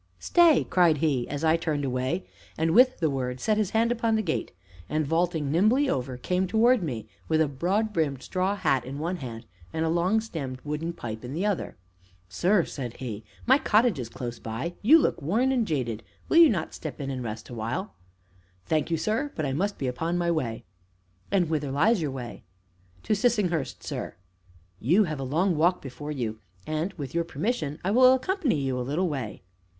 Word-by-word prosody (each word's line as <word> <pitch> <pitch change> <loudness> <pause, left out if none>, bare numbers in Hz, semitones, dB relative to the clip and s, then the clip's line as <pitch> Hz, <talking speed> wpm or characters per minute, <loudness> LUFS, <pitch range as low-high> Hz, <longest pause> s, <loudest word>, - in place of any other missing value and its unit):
"Stay!" 340 -5 +4
cried 170 -4 +4
he 140 -5 0
as 145 +2 -4
I 160 +1 +4
turned 150 -4 -2
away, 130 +7 -1 0.3
and, 160 +1 +1
with 255 +6 +5
the 165 - +2
word, 125 -2 -3
set 215 - +1
his 210 -4 +1
hand 230 +2 +2
upon 230 -2 +1
the 220 - +1
gate, 160 -5 -2 0.4
and, 155 0 0
vaulting 165 -2 0
nimbly 215 - +3
over, 125 - -2
came 180 +8 0
towards 230 +4 +4
me, 120 -10 -4 0.2
with 160 -1 +2
a 160 - +3
broad 190 +10 -1
brimmed 145 -6 -1
straw 190 +2 0
hat 135 -10 +1
in 135 +3 -6
one 170 +5 -2
hand 120 -5 -7 0.3
and 160 - -1
a - - +1
long 175 +6 +2
stemmed 145 - -5
wooden 150 +3 -3
pipe 110 -8 -7
in 125 +2 -6
the 185 +5 -1
other. 205 -3 -2 0.5
"Sir," 175 - +2
said 125 -5 -6
he, 110 -5 -6 0.2
"my 265 +3 +5
cottage 220 - +3
is 120 -2 -5
close 120 -1 -6
by; 115 +10 -4
you 285 +10 +7
look 315 - +1
worn 225 - +1
and 240 -5 +1
jaded. 120 - -2 0.3
Will - - +3
you 335 -2 +9
not 170 -7 -2
step 155 -5 -7
in 135 -1 -3
and 130 -2 -4
rest 110 -1 -6
awhile?" 120 - -4 0.7
"Thank 155 - 0
you, 165 - +1
sir; 220 - -1
but 155 - -2
I 135 - -1
must 200 +8 -1
be 135 - -3
upon 165 +8 -1
my 170 -1 +1
way." 125 -9 -2 0.7
"And 190 -4 +2
whither 150 -3 -1
lies 180 - +3
your 150 - -1
way?" 130 -3 -7 0.6
"To - - +1
Sissinghurst, 200 - 0
sir." - - -5 0.6
"You 175 - +4
have 155 -6 -3
a - - -3
long 170 +7 +1
walk 175 +4 +3
before 145 +3 -7
you, 115 -6 -3 0.3
and, 155 +4 -2
with 140 -7 -7
your 170 0 +1
permission, 160 - -2
I 190 - 0
will 255 +3 +7
accompany 300 - 0
you 135 -2 -1
a - - -1
little 150 +9 0
way." 130 - -5
160 Hz, 200 wpm, -27 LUFS, 135-200 Hz, 0.7 s, you